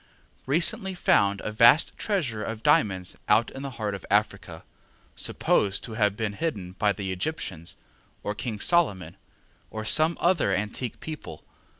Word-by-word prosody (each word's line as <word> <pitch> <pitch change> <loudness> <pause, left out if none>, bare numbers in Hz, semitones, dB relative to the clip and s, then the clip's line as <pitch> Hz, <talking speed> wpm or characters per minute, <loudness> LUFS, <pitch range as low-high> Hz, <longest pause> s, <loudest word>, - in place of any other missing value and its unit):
recently 175 +6 +1
found 100 - +2
a 105 - -4
vast 115 +8 +5
treasure 140 - -2
of 115 +2 -6
diamonds 95 -5 +2
out 110 +2 +3
in 135 - -8
the 140 - -4
heart 105 -3 -2
of 100 - -7
Africa, - - -1 0.5
supposed 100 -1 +1
to 115 - -4
have 105 -2 +1
been 110 -2 -2
hidden 100 - -4
by 105 +2 +1
the 95 -1 -4
Egyptians, 90 - -4 0.5
or 105 - -2
King 110 -1 -5
Solomon, 100 - +1 0.5
or 110 0 -6
some 155 +8 +3
other 170 - +2
antique 105 +4 -4
people. 155 - -8
110 Hz, 145 wpm, -26 LUFS, 100-140 Hz, 0.5 s, vast